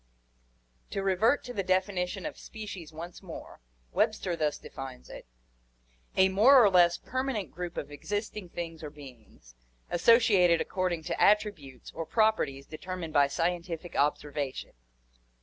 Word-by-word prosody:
To 195 - -3
revert 195 +8 +2
to 245 - -7
the 200 - -1
definition 185 +1 -1
of 305 - -4
species 200 -7 -8
once 170 +3 -9
more, 180 -4 -10 0.3
Webster 175 - 0
thus 155 -2 0
defines 130 -2 -9
it: - - -10 0.9
"A 190 - +6
more 230 +9 +7
or 205 - +5
less 175 -2 +5
permanent 255 -7 -3
group 175 0 -6
of 145 - -5
existing 205 +5 -4
things 165 -2 -6
or 150 - -6
beings, 125 - -15 0.4
associated 180 -3 +5
according 180 -3 -1
to - - -3
attributes, 200 -11 +1
or 165 -1 -6
properties 215 -12 +1
deter 180 +4 -7
mined 165 -4 -6
by 145 -2 +5
scientific 170 +2 -3
observation." 145 -1 -1
175 Hz, 135 wpm, -29 LUFS, 155-200 Hz, 0.9 s, more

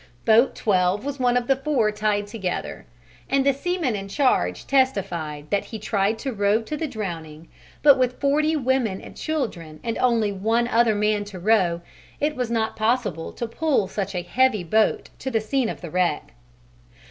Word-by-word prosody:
Boat 225 +4 +4
12 190 +2 +1
was 285 -1 -4
one 245 -1 +3
of 245 - -1
the 270 - +3
four 270 -6 +1
tied 210 -1 0
together, 205 -4 -5 0.4
and 275 0 +2
the 275 - +4
seaman 315 -3 -1
in 195 -1 -5
charge 195 - +1
testified 180 - 0
that 200 - +1
he 225 - -7
tried 210 0 0
to 265 +3 -4
row 205 +1 +2
to 300 - -4
the 315 +1 -2
drowning, 165 - -6 0.3
but 285 -2 +7
with 255 -1 0
forty 300 +3 +2
women 255 -8 0
and - - -12
children 195 - -4
and 230 -1 -3
only 230 -4 +2
one 225 +5 0
other 230 -2 +3
man 210 0 +1
to 200 -2 -9
row, 180 -3 +2 0.4
it 300 +1 0
was 250 -3 -2
not 225 -1 -1
possible 215 -7 -1
to 235 - -4
pull 255 -3 0
such 195 0 -4
a 175 - -2
heavy 215 +2 +2
boat 215 +6 +1
to 265 - -3
the 225 -3 +1
scene 235 +2 0
of - - -6
the 170 -3 -7
wreck. 180 -4 0
220 Hz, 180 wpm, -23 LUFS, 195-260 Hz, 0.4 s, but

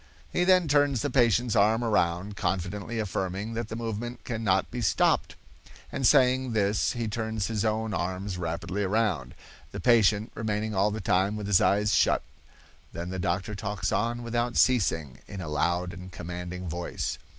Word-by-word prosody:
He 175 - +2
then 185 -2 +4
turns 145 -4 +2
the 145 - -1
patient's 120 -2 +3
arm 110 +3 +3
around, 100 -2 0
confidently 95 +5 -2
affirming 100 0 -3
that 115 -1 -3
the 110 - -6
movement 115 +1 -5
cannot 110 -6 0
be 125 0 -4
stopped, 110 - +2 0.6
and 135 -3 +1
saying 130 -3 +4
this 100 -1 +1
he 120 -2 -3
turns 110 -1 -2
his 110 -2 -1
own 110 0 -1
arms 95 +1 -3
rapidly 85 +3 -3
around, 95 - 0 0.4
the - - -6
patient 110 -2 +3
remaining 110 0 -2
all 100 +1 +2
the 110 +1 -4
time 95 +2 +1
with 105 -1 -5
his 100 -2 +4
eyes 105 +2 +2
shut; - - +3 0.7
then 85 +2 -5
the 95 - -4
doctor 95 +3 -1
talks 105 -1 -3
on 120 +2 -1
without 120 0 -1
ceasing 80 - +2
in 100 - -7
a 90 - -5
loud 85 +4 0
and 90 0 -9
commanding 90 +1 -6
voice. 85 +2 -3
105 Hz, 165 wpm, -27 LUFS, 95-115 Hz, 0.7 s, then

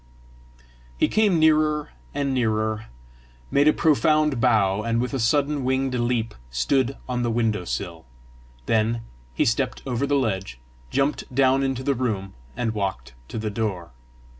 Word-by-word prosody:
He - - +3
came 210 -5 +3
nearer 155 -1 +3 0.2
and 140 -1 -1
nearer, 110 -3 0 0.6
made 145 +1 +4
a - - +8
profound 150 -4 +2
bow, 105 -5 +3
and 115 +1 0
with 125 +3 -2
a 135 - -1
sudden 145 +4 +1
winged 130 0 0
leap 120 -2 0 0.2
stood 130 - +1
on 125 -1 -1
the 120 - 0
window 110 -5 0
sill. 85 -1 -4 0.6
Then 115 +3 +1 0.3
he - - +2
stepped 125 +2 0
over 130 +1 -1
the 145 - +2
ledge, 95 - -2 0.3
jumped 140 +1 -1
down 135 0 +4
into 135 -1 -1
the 140 - +2
room, 110 -7 -2 0.2
and 120 -3 -1
walked 95 - -3
to - - -6
the 110 -1 -2
door. 100 - -3
125 Hz, 150 wpm, -24 LUFS, 110-140 Hz, 0.6 s, a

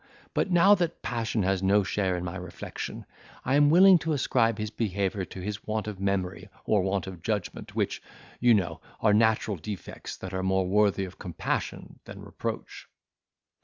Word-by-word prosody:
But - - 0
now 180 +3 +6
that 175 -4 -1
passion 115 -3 -1
has 95 0 +1
no 100 +2 +4
share 95 -1 0
in 90 - -4
my 85 +1 -5
reflection, 90 -2 -7 0.4
I 130 - +1
am 145 +1 +5
willing 185 +2 +7
to 160 0 -1
ascribe 115 -5 +2
his 105 -1 -3
behaviour 100 -3 -1
to 95 - -9
his 105 +2 -5
want 110 0 -2
of 105 -3 -5
memory 95 0 -2 0.2
or 105 -2 +3
want 95 +1 -1
of 95 -3 -8
judgment, 105 0 -3
which, - - -1 0.4
you 120 -1 +5
know, 85 -5 -1 0.2
are 105 -2 +4
natural 110 -1 +2
defects, 100 +4 -7
that 95 0 -7
are 95 - -1
more 95 0 +1
worthy 100 0 +2
of 95 - -12
compassion 90 -5 -4
than - - -10
reproach. - - -6
100 Hz, 175 wpm, -27 LUFS, 95-115 Hz, 0.4 s, willing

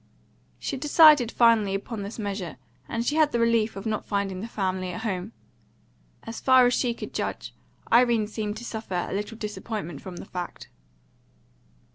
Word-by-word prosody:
She 275 - -4
decided 295 -3 +6
finally 225 -4 +4
upon 205 +2 -5
this 200 +2 -6
measure, 200 -6 -4 0.3
and 230 0 -2
she 295 +5 0
had 310 -2 +4
the 235 - 0
relief 230 -2 +2
of 195 +2 -7
not 220 -1 -1
finding 200 -2 -2
the 225 - -5
family 185 -4 -2
at 180 +5 -5
home. 195 -2 -3 0.9
As 225 0 -7
far 260 -1 +6
as 245 - +3
she 240 -2 0
could - - -8
judge, - - -4 0.4
Irene 235 -2 +5
seemed 210 0 -4
to 240 - -8
suffer 215 -7 -3
a - - -5
little 210 +3 -4
disappointment 210 -4 -5
from 185 -2 -8
the - - -8
fact. 180 -2 -7
220 Hz, 170 wpm, -26 LUFS, 195-235 Hz, 0.9 s, decided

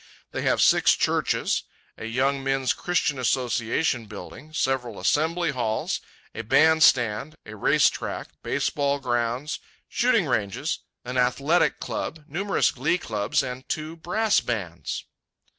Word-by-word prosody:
They - - -3
have - - +2
six - - +5
churches, - - +1 0.3
a - - -8
Young 135 +4 0
Men's 135 -1 +1
Christian 160 -6 0
Association 120 0 0
building, 105 +9 -10
several 130 -7 -1
assembly 160 - +1
halls, 115 -4 -1 0.3
a 115 - -4
band 160 +8 +4
stand, 125 +2 +3
a 110 - -9
race 105 - +4
track, - - -4
baseball 140 -1 0
grounds, 120 +2 -1 0.3
shooting 235 -6 +2
ranges, 105 -8 -1 0.3
an 125 +1 -1
athletic 140 +7 +2
club, 160 -1 -4
numerous 195 +7 +1
glee 175 - 0
clubs, 105 - -1
and 125 +1 -7
two 155 +1 -3
brass 205 +6 +1
bands. 90 - -4
135 Hz, 125 wpm, -25 LUFS, 115-155 Hz, 0.3 s, six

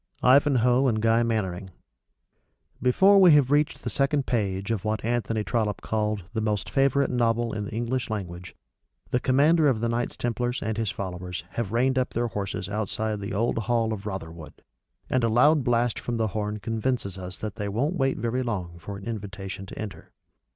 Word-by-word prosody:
IVANHOE 130 -1 +4
AND 110 -3 +1
GUY 115 +1 +3
MANNERING 100 -5 -1 1.1
_Before 190 +11 +5
we 180 -4 +8
have 140 -3 +4
reached 150 +1 +1
the - - -2
second 140 0 +1
page 100 -3 -1
of 110 -4 -1
what 110 0 -2
Anthony 115 -2 0
Trollope 105 -3 -1
called 105 -2 -1
"the 110 - -1
most 105 -2 -1
favorite 140 0 +2
novel 120 -1 +1
in 105 -1 -3
the - - -7
English 120 +3 -2
language," 90 -4 -6 0.6
the 125 - +2
Commander 150 +5 +4
of 125 -6 +2
the 115 - 0
Knights 120 +1 -2
Templars 120 +1 -1
and 110 0 -2
his 110 -1 -1
followers 90 -2 -5
have 115 -5 -3
reined 130 +3 +2
up 130 - -2
their 120 +1 0
horses 100 -2 -4
outside 105 +1 -2
the 100 +2 -4
old 115 +2 +1
hall 115 -1 0
of 105 0 -6
Rotherwood, 80 -6 -7 0.4
and 130 -2 +1
a 115 - +3
loud 145 +6 +4
blast 120 -1 +1
from 120 -1 -3
the 110 -1 0
horn 105 +1 -3
convinces 110 -3 -2
us 90 0 -7
that 105 0 -6
they 105 -1 -3
won't 135 - 0
wait 135 -4 +1
very 120 +2 -1
long 90 -8 -4
for 100 +4 -7
an 95 - -10
invitation 95 -3 -6
to - - -10
enter. 105 -3 -7
115 Hz, 185 wpm, -26 LUFS, 100-125 Hz, 1.1 s, we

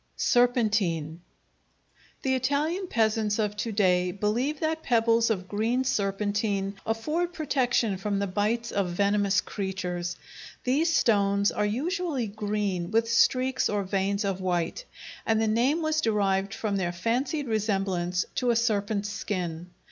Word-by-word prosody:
Serpentine 210 -10 +1 1.0
The 265 - +1
Italian 295 +9 0
peasants 220 -4 +1
of 210 -2 -1
to 230 - -2
day 180 -3 +2
believe 235 +10 -1
that 320 0 -1
pebbles 230 -2 +3
of 185 -4 -1
green 225 +6 0
serpentine 200 -2 -1
afford 310 +11 -1
protection 245 - +1
from 200 +1 -2
the 200 - 0
bites 215 +5 -1
of 195 -3 0
venomous 200 +1 +2
creatures. 180 -3 -4 0.5
These 300 +7 +2
stones 200 -7 +3
are 210 - 0
usually 305 - -1
green 205 -4 -2
with 230 +1 +1
streaks 255 +2 +3
or 205 -1 0
veins 195 +2 -1
of 190 -1 -2
white, 180 - -1 0.4
and 220 -1 +1
the 220 - +1
name 255 +9 +2
was 310 0 +1
derived 195 -3 +1
from 205 -3 -1
their 175 -2 -1
fancied 255 - -1
resemblance 195 -5 0
to 250 - +1
a 235 - +3
serpent's 210 -2 0
skin. 180 -5 -4
210 Hz, 135 wpm, -27 LUFS, 195-245 Hz, 1.0 s, pebbles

